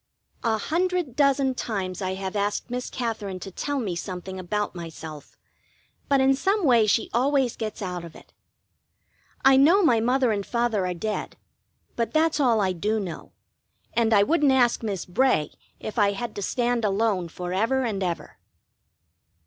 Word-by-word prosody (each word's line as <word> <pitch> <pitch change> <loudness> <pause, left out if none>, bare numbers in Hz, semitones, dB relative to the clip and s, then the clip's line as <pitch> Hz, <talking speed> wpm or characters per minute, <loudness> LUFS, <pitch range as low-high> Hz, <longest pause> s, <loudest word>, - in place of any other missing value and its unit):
A 225 -2 +2
hundred 345 - -1
dozen 275 -2 +3
times 195 -7 -4
I 185 0 -2
have 190 +1 -5
asked 205 +4 -1
Miss 250 0 -3
Katherine 215 -6 -4
to 195 - -7
tell 285 +9 -3
me 200 -8 -2
something 185 +1 -6
about 210 +3 -2
myself, 160 -3 -9 0.7
but 275 -1 +4
in 265 0 +4
some 390 +6 +1
way 235 -5 +5
she 215 +2 +2
always 260 +1 +2
gets 215 -2 -5
out 180 -2 -4
of 170 - -11
it. - - -16 1.1
I 270 0 +7
know 335 +9 +5
my 240 -9 +4
mother 250 +1 +2
and 200 -2 -1
father 235 -4 0
are 180 - -3
dead, 215 +5 -4 0.6
but 230 -1 -2
that's 315 -1 +3
all 240 -6 +3
I 190 -2 +1
do 210 +5 -1
know; 180 -6 -7 0.6
and 230 -1 +2
I 205 -2 +6
wouldn't 300 +2 +3
ask 245 -3 +3
Miss 200 -6 -3
Bray 210 - +1 0.3
if 215 - -4
I 200 -1 +4
had 230 +3 -5
to 205 - -4
stand 240 +2 0
alone 200 -3 +1
for 180 +1 -5
ever 230 +7 +1
and 210 -5 -2
ever. 175 -3 -4
220 Hz, 170 wpm, -25 LUFS, 190-260 Hz, 1.1 s, I